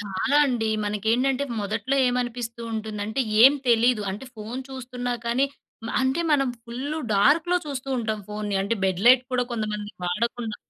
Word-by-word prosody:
చాలా 205 +7 0
అండి. 235 -4 0 0.2
మనకేంటంటే 235 +7 +1 0.2
మొదట్లో 215 +6 -2
ఏమనిపిస్తూ 240 -1 -3
ఉంటుందంటే, 215 +1 -3 0.2
ఏం 270 - +9 0.2
తెలీదు. 235 -1 +4
అంటే 210 +7 -6
ఫోన్ 225 +5 -6
చూస్తున్నా 250 -2 -4
కానీ 250 +4 +2 0.4
మ - - -5
అంటే 265 +5 +1
మనం 275 -2 +3 0.2
ఫుల్లు 265 +6 -4 0.2
డార్క్‌లో 320 - +4
చూస్తూ 270 -2 -5
ఉంటాం 220 -2 -2
ఫోన్‌ని. 210 -1 -3
అంటే 200 +4 0
బెడ్ 190 -1 0
లైట్ 250 0 +8
కూడా 250 -1 +1
కొంతమంది 210 -2 -3
వాడకుండా 220 +4 -2
235 Hz, 145 wpm, -25 LUFS, 210-260 Hz, 0.4 s, ఏం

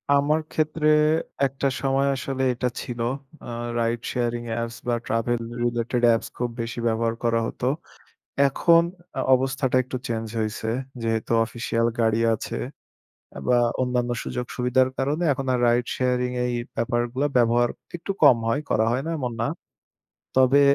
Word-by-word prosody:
আমার 145 +2 +3
ক্ষেত্রে 155 0 0 0.6
একটা 135 +1 -2
সময় 135 0 +2
আসলে 130 0 -3
এটা 125 +1 -1
ছিল। 120 -2 -6 0.4
আ - - -9 0.3
রাইড 115 0 0
শেয়ারিং 120 -1 -1
অ্যাপস 115 0 -3
বা 120 - +2
ট্রাভেল 115 +1 0 0.2
রিলেটেড 120 0 0
অ্যাপস 115 -1 +3
খুব 125 0 -1
বেশি 115 +1 -4
ব্যবহার 115 0 0
করা 115 -1 +2
হতো। 125 - -3 0.8
এখন 170 +4 +4 0.3
আ - - +1
অবস্থাটা 130 0 0
একটু 130 +1 -5
চেঞ্জ 115 -1 -2
হইসে। 110 +1 -2 0.3
যেহেতু 115 0 -1
অফিসিয়াল 115 0 -1
গাড়ি 110 -1 +3
আছে 110 - -4 0.7
অ্যা - - -9
বা 125 -1 +4 0.2
অন্যান্য 125 -1 0
সুযোগ-সুবিধার 125 +1 0
কারণে 145 +6 0
এখন 135 0 -4
আর 125 - +1
রাইড 120 0 +3
শেয়ারিং 125 -1 +1
এই 125 - -1 0.2
ব্যাপারগুলা 120 +4 0
ব্যবহার 120 0 +4 0.3
একটু 175 - -4
কম 130 -5 +8
হয়, 140 +6 +1
করা 110 - +3
হয় 130 +3 0
না 165 - -3
এমন 125 -4 -2
না। 115 - +1 0.9
তবে 130 +2 +6
120 Hz, 150 wpm, -24 LUFS, 115-130 Hz, 0.9 s, কম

